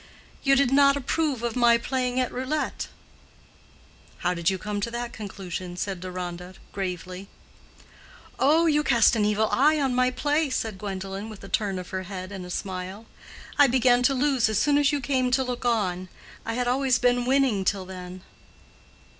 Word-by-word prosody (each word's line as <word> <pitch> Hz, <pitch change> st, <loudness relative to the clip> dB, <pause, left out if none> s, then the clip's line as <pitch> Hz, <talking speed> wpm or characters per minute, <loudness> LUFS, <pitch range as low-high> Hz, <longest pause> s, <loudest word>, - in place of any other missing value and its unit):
"You 275 Hz, -1 st, +4 dB
did 275 Hz, -2 st, +3 dB
not 280 Hz, 0 st, +5 dB
approve 285 Hz, -2 st, -1 dB
of 235 Hz, 0 st, -2 dB
my 240 Hz, -1 st, +5 dB
playing 250 Hz, +1 st, -1 dB
at 255 Hz, -, 0 dB
roulette." 260 Hz, +5 st, -2 dB, 1.4 s
"How 180 Hz, -, +3 dB
did 170 Hz, -1 st, +1 dB
you 190 Hz, -, -1 dB
come 205 Hz, +2 st, -4 dB
to 235 Hz, -, -1 dB
that 235 Hz, 0 st, -5 dB
conclusion?" 185 Hz, -4 st, -6 dB
said 195 Hz, -1 st, -3 dB
Deronda, 180 Hz, 0 st, -6 dB, 0.2 s
gravely. 185 Hz, 0 st, -5 dB, 1.1 s
"Oh, 315 Hz, +5 st, +4 dB
you 300 Hz, -2 st, +3 dB
cast 245 Hz, -4 st, +4 dB
an 210 Hz, -2 st, +2 dB
evil 210 Hz, +1 st, +2 dB
eye 300 Hz, +4 st, +4 dB
on 270 Hz, -3 st, +1 dB
my 255 Hz, 0 st, +3 dB
play," 290 Hz, +4 st, 0 dB
said 220 Hz, -6 st, -3 dB
Gwendolen, 195 Hz, +1 st, -5 dB
with 215 Hz, -3 st, -11 dB
a 195 Hz, -, -9 dB
turn 200 Hz, -3 st, 0 dB
of 180 Hz, -1 st, -7 dB
her 190 Hz, -1 st, -2 dB
head 185 Hz, -1 st, -6 dB
and 190 Hz, -3 st, -7 dB
a -, -, -10 dB
smile. 190 Hz, +3 st, -5 dB, 0.5 s
"I 285 Hz, -, +8 dB
began 250 Hz, -1 st, +3 dB
to 270 Hz, +2 st, +3 dB
lose 265 Hz, -4 st, +2 dB
as 215 Hz, -, 0 dB
soon 290 Hz, +4 st, +3 dB
as 290 Hz, 0 st, +3 dB
you 290 Hz, -1 st, -1 dB
came 255 Hz, -1 st, +1 dB
to 265 Hz, +1 st, +2 dB
look 250 Hz, -1 st, -4 dB
on. 185 Hz, -6 st, 0 dB, 0.4 s
I 225 Hz, -, -2 dB
had 245 Hz, 0 st, -1 dB
always 255 Hz, 0 st, +2 dB
been 245 Hz, -1 st, +2 dB
winning 260 Hz, -7 st, +2 dB
till 190 Hz, -1 st, 0 dB
then." 185 Hz, 0 st, -9 dB
235 Hz, 180 wpm, -25 LUFS, 190-260 Hz, 1.4 s, I